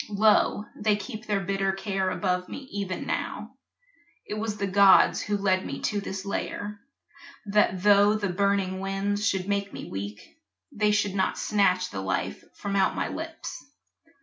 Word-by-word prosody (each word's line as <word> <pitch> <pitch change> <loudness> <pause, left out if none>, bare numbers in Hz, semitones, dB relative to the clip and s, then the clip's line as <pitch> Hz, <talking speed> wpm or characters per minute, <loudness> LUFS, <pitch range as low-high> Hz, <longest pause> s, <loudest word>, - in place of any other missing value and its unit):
Lo, 210 0 +3
they 210 0 +2
keep 215 +2 -7
Their 205 -2 +1
bitter 195 0 0
care 195 -1 -1
above 180 -1 -1
me 270 - -8
even 200 -2 -3
now. - - -3 0.7
It - - -5
was 215 0 -3
the 200 - -1
gods 195 0 +6
who 205 0 -1
led 190 -2 +1
me - - -5
to 205 -1 -1
this 195 0 -5
lair, 205 +1 -4 0.7
That 200 -3 +2
tho' 205 0 +6
the 205 -2 -1
burning 195 0 +1
winds 195 +1 -1
should 190 -1 0
make 200 -1 -1
me - - -8
weak, 100 +2 -7 0.3
They 210 0 +1
should 210 -2 +1
not 190 -1 0
snatch 185 -3 +2
the 95 - -4
life 95 -1 -2
from 200 -1 -4
out 190 -1 +2
my - - -1
lips. - - -6
200 Hz, 165 wpm, -27 LUFS, 190-205 Hz, 0.7 s, gods